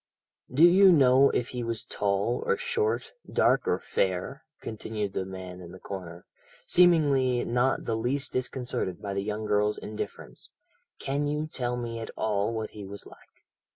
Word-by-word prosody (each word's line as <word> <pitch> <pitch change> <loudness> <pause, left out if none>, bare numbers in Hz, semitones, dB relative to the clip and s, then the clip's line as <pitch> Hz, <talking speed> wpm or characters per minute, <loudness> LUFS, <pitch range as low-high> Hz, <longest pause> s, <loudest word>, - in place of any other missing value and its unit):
"Do 145 +6 +6
you 190 +2 +7
know 135 -3 +6
if 120 - -1
he 125 - -4
was 115 -1 -3
tall 100 +3 -1
or 470 - +2
short, 455 -2 -1 0.2
dark - - +3
or - - +2
fair?" - - -2 0.2
continued 105 -2 -4
the 95 - -2
man 95 -1 -8
in 85 0 -10
the 95 - -11
corner, 90 -3 -8 0.4
seemingly 145 -8 +4
not 125 +2 +1
the 115 - -1
least 130 +5 -1
disconcerted 125 -7 -2
by 100 -2 -4
the 100 - -1
young 105 +1 -3
girl's 105 0 +1
indifference. 105 0 -7 0.5
"Can 140 +2 -2
you 150 +1 -1
tell 125 -5 -3
me 115 -1 -4
at 115 - -6
all 105 0 0
what 110 -1 -4
he 105 - -9
was 100 +1 -7
like?" - - -18
115 Hz, 165 wpm, -28 LUFS, 105-140 Hz, 0.5 s, you